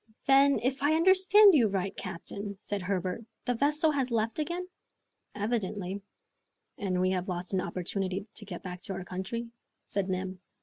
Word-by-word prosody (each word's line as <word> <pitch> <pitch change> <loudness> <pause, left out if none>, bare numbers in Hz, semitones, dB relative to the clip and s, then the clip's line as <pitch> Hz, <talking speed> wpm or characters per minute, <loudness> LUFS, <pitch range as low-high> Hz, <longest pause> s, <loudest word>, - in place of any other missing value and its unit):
"Then, 275 +1 +6
if 260 +2 0
I 295 +2 +3
understand 380 +4 +7
you 250 -8 +5
right, 195 -1 -2
captain," 200 +3 -6
said 205 0 -3
Herbert, 185 +2 -2 0.2
"the 245 - +1
vessel 300 +5 +2
has 270 -3 0
left 230 +2 0
again?" 345 +4 -2 0.7
"Evidently." 205 -3 -2 0.8
"And 185 -3 0
we 185 0 +2
have 185 0 -2
lost 180 +1 -3
an 190 - +2
opportunity 185 +2 -3
to 210 - -7
get 180 -4 -7
back 180 -1 -6
to 195 - -4
our 190 0 -5
country?" 230 +6 -4 0.3
said 200 -1 -2
Neb. 185 0 -3
200 Hz, 165 wpm, -30 LUFS, 185-270 Hz, 0.8 s, understand